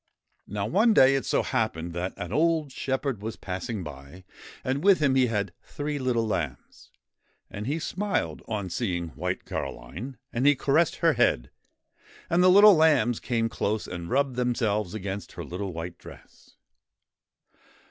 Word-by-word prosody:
Now 100 0 -3
one 215 - +3
day 130 +1 +7
it 135 - -1
so - - +2
happened 100 - -2
that 90 +2 -3
an 85 +3 -5
old 160 -1 +2
shepherd 135 -4 -2
was 110 +1 -4
passing 95 +2 -5
by, 70 +4 -10 0.4
and 135 +4 -1
with 195 -1 +6
him 140 -3 +2
he 130 -1 +4
had 100 -6 -2
three 145 0 -4
little 125 -3 0
lambs; 80 - -4 0.6
and 105 +3 -5
he 145 +4 0
smiled 170 - -2
on 100 -5 -3
seeing 85 -6 -2
White - - -4
Caroline, 85 - -6 0.2
and 125 +4 +1
he 145 - +6
caressed 145 +5 +2
her - - +6
head, - - +1 0.8
and 170 +1 +4
the 185 - +6
little 205 +3 +9
lambs 150 -8 +3
came 115 -2 0
close 110 -1 -2
and 85 -1 -6
rubbed 135 -1 +1
themselves 110 -6 0
against 100 -1 -5
her - - -6
little 95 +2 -5
white 85 +1 -7
dress. - - -15
115 Hz, 160 wpm, -27 LUFS, 90-140 Hz, 0.8 s, little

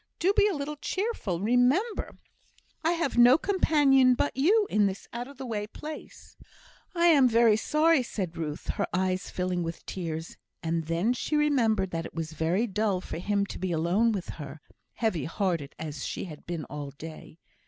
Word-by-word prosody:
Do 375 +4 +2
be 415 - +5
a 400 - -1
little 290 +1 -4
cheerful. 375 - -2
Remember, 250 - +1 0.7
I 330 +2 +3
have 330 -8 -1
no 245 +3 +8
companion 290 -9 +4
but 285 - -1
you 400 - +4
in 210 -1 +3
this 195 0 -6
out 240 +1 -4
of 280 -1 -13
the 265 - -6
way 210 -3 -3
place." 305 +7 -10 0.6
"I 340 0 +3
am 285 -7 +6
very 230 -1 +5
sorry, 305 +6 +3
sir," 245 - -9
said 175 -2 -6
Ruth, 150 -2 -5
her - - -1
eyes 185 +1 0
filling 180 -1 -2
with 165 0 -5
tears; 165 -3 -5 0.3
and 165 0 -1
then 170 +9 +1
she 300 - -2
remembered 230 -10 +2
that 165 0 -3
it - - -17
was 160 -1 -4
very 170 +8 +1
dull 210 -3 0
for 170 - -6
him 200 +2 0
to - - -8
be 185 -1 -2
alone 175 +8 +2
with 195 -5 -4
her, 145 +1 -8 0.3
heavy 215 - -1
hearted 165 -5 -2
as 155 -2 -6
she - - -4
had 155 -5 -10
been 165 -4 -4
all 145 -1 -6
day. 155 +2 -10
210 Hz, 185 wpm, -28 LUFS, 170-280 Hz, 0.7 s, no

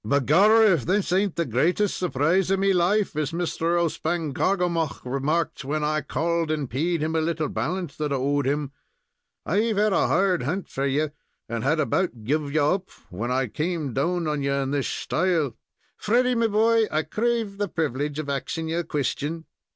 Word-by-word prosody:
"Begorrah, 190 - +5
if 155 -8 0
this 190 0 0
ain't 195 -1 +1
the 170 - 0
greatest 170 - +1
surprise 175 +2 +1
of 195 - +2
me 195 0 +3
life, 190 +2 +2
as 150 -2 -1
Mr. 170 0 0
O'Spangarkoghomagh 170 0 -1
remarked 145 +6 -1
when 150 +3 -2
I 155 0 0
called 165 +3 -1
and 150 -3 -1
paid 155 +7 -1
him 160 +1 -1
a 160 - +2
little 160 -2 -1
balance 175 -3 -3
that 150 -1 -2
I - - +1
owed 140 +1 0
him. 145 0 -1 0.7
I've 215 +4 +1
had 210 0 +3
a - - +3
hard 190 -2 +2
hunt 170 +10 -2
for 135 +1 -1
you, 145 +2 0 0.4
and 115 -1 -3
had 155 +4 +2
about 155 - 0
guv 145 +4 -1
you 150 0 +2
up 185 +6 0 0.2
when 110 +7 -3
I 130 +1 +1
came 150 - -3
down 170 +6 0
on 150 -1 -1
you 140 0 0
in 135 -1 -1
this 145 -2 0
shtyle. 160 -6 0 0.4
Freddy, 250 +4 +2
me 230 -1 +2
boy, 225 +1 +3
I 155 +1 +1
crave 220 +3 -1
the 205 - 0
privilege 145 -3 -2
of 155 -2 -4
axing 160 +4 -3
ye 165 - -1
a 175 - 0
question." 150 +2 -3
160 Hz, 185 wpm, -25 LUFS, 145-185 Hz, 0.7 s, Begorrah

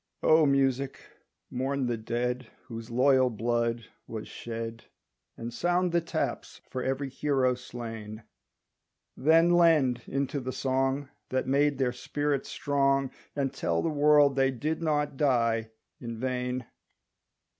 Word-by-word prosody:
O 155 -1 +5
Music 135 -1 +1 0.5
mourn 135 +1 -1
the 120 -1 0
dead 120 +2 -2 0.2
Whose 115 -2 -8
loyal 130 +1 +4
blood 115 0 -1 0.2
was 110 -2 -6
shed, 115 -1 -6 0.5
And 115 +1 -6
sound 175 +5 +1
the 170 0 +2
taps 170 - -3
for 130 - -3
every 135 +2 -1
hero 135 -1 +1
slain; 115 -3 -7 0.9
Then 165 +5 +4
lend 155 -8 +4
into 140 +1 -1
the 130 0 -4
song 135 +1 0 0.2
That 130 0 0
made 140 +1 +2
their 130 -2 +1
spirit 145 +3 -2
strong, 135 -1 +1 0.2
And 140 -2 -1
tell 85 0 -1
the - - +1
world 145 -2 +5
they 135 -1 +3
did 150 +6 -2
not 150 -3 0
die 115 -5 +2 0.3
in 115 -2 -6
vain. 125 0 -2
130 Hz, 130 wpm, -28 LUFS, 120-145 Hz, 0.9 s, O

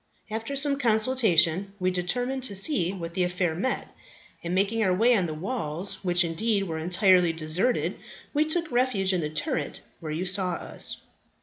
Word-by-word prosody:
After 225 +5 -4
much 280 -1 -1
consultation 215 - +2
we 185 0 +1
determined 245 +9 -2
to 205 - -4
see 190 - +1
what 170 -3 -7
the 185 - -1
affair 180 -1 0
meant, 200 +11 -2 0.6
and 175 +1 -2
making 205 +4 +1
our 190 - +2
way 235 +5 +4
on 185 -5 +1
to 155 - -4
the - - -8
walls, 185 -3 -3
which, 175 -1 +2
indeed, 200 +5 0
were 165 -4 -4
entirely 180 +1 +3
deserted, 165 +9 -1 0.3
we 300 +1 +3
took 325 0 -1
refuge 240 -6 +1
in 180 - 0
that 150 0 -5
turret 145 - -2 0.2
where 155 -2 -6
you 165 +4 -3
saw 185 -1 -1
us. - - +2
190 Hz, 180 wpm, -26 LUFS, 170-230 Hz, 0.6 s, way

